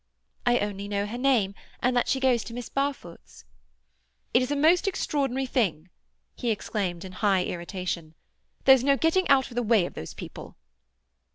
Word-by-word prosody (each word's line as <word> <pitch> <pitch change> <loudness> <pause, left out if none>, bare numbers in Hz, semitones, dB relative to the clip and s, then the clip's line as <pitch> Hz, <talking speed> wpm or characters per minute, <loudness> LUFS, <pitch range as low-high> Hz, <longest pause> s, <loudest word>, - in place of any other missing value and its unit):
"I 240 0 +5
only 200 -2 -3
know 200 0 -1
her 220 +4 -5
name, 245 -7 +2 0.3
and 250 +1 +1
that 245 - +2
she 265 - +1
goes 255 -4 +2
to 230 - -8
Miss 245 -1 -6
Barfoot's." 275 0 -4 0.9
"It's 255 +1 +3
a 290 - 0
most 320 +6 +4
extraordinary 270 -8 -1
thing," 185 - -1 0.4
he 245 - -3
exclaimed 195 -4 -2
in 185 - -8
high 190 -1 +1
irritation. 175 -2 -5 0.5
"There's 265 -2 +7
no 275 0 +3
getting 325 +5 +2
out 265 -2 +4
of - - -10
the 245 - +1
way 220 -5 +3
of - - -7
those 80 - -8
people." - - -9
240 Hz, 170 wpm, -26 LUFS, 195-270 Hz, 0.9 s, There's